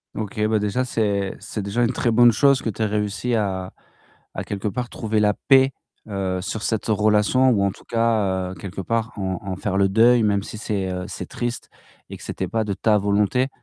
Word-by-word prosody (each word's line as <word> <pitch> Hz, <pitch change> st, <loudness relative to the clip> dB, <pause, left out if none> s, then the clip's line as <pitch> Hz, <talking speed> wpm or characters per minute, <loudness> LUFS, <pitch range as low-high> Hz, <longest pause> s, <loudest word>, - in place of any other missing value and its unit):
OK, 105 Hz, -1 st, -5 dB
bah, 110 Hz, 0 st, +2 dB
déjà, 105 Hz, +5 st, -1 dB
c'est 100 Hz, -5 st, -1 dB
c'est 105 Hz, -, -5 dB
déjà 100 Hz, +5 st, -1 dB
une 120 Hz, -, +2 dB
très 120 Hz, -, 0 dB
bonne 120 Hz, +1 st, +6 dB
chose 140 Hz, +3 st, +3 dB
que -, -, -2 dB
tu 110 Hz, -, -6 dB
aies -, -, +3 dB
réussi 105 Hz, +3 st, -1 dB
à 95 Hz, -4 st, -2 dB, 0.6 s
à -, -, -3 dB
quelque 100 Hz, +1 st, -4 dB
part, 125 Hz, +3 st, -3 dB
trouver 110 Hz, -1 st, -1 dB
la 105 Hz, -1 st, +3 dB
paix, 135 Hz, +3 st, +4 dB, 0.4 s
heu, 95 Hz, -2 st, -2 dB
sur 105 Hz, +3 st, -4 dB
cette 110 Hz, -2 st, -1 dB
relation 110 Hz, +4 st, +3 dB
ou 100 Hz, -4 st, +2 dB
en 100 Hz, -, +1 dB
tout -, -, -16 dB
cas, 105 Hz, -6 st, 0 dB
heu, -, -, -8 dB
quelque 95 Hz, -1 st, -8 dB
part 115 Hz, +4 st, -1 dB
en 95 Hz, -2 st, -2 dB
en 95 Hz, -2 st, -4 dB
faire 100 Hz, 0 st, -2 dB
le 100 Hz, 0 st, +3 dB
deuil, 115 Hz, +3 st, +5 dB
même 100 Hz, -2 st, +2 dB
si 110 Hz, -, -8 dB
c'est, 100 Hz, -3 st, -2 dB
heu, 90 Hz, 0 st, -4 dB
c'est 95 Hz, -, -6 dB
triste 120 Hz, 0 st, -4 dB, 0.4 s
et -, -, -7 dB
que -, -, -13 dB
c'était 95 Hz, -, -4 dB
pas 110 Hz, +5 st, -1 dB
de 105 Hz, -2 st, -2 dB
ta 105 Hz, +2 st, +2 dB
volonté 105 Hz, +5 st, +1 dB
105 Hz, 220 wpm, -22 LUFS, 100-115 Hz, 0.6 s, bonne